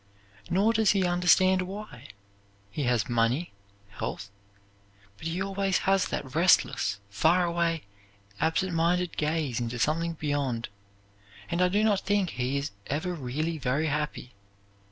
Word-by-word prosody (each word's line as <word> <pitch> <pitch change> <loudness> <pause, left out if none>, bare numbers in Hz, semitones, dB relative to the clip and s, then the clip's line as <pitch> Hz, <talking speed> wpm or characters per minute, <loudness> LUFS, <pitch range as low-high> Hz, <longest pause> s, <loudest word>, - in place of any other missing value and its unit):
Nor 205 +5 +3
does 220 -2 +3
he 195 -2 +2
understand 180 +1 +4
why. 190 - -8 0.6
He 145 +5 -2
has 120 -4 +1
money, 120 +7 +1 0.4
health; 100 0 -6 0.9
but 160 - -5
he 165 +2 -2
always 195 -1 0
has 195 0 +3
that 130 -2 -5
restless 155 - +3
far 165 - +3
away, 170 -1 0 0.6
absent 170 +3 0
minded 175 +2 +1
gaze 150 -5 -1
into 120 0 -3
something 165 +6 0
beyond, 140 -7 -2 0.8
and 170 +1 0
I 180 - +5
do 205 +4 +1
not 210 -3 +3
think 200 -3 0
he 130 +3 -1
is 140 +1 -3 0.2
ever 160 +6 -2
really 155 +2 -3
very 140 +4 0
happy. 150 -4 -3
165 Hz, 135 wpm, -28 LUFS, 135-185 Hz, 0.9 s, I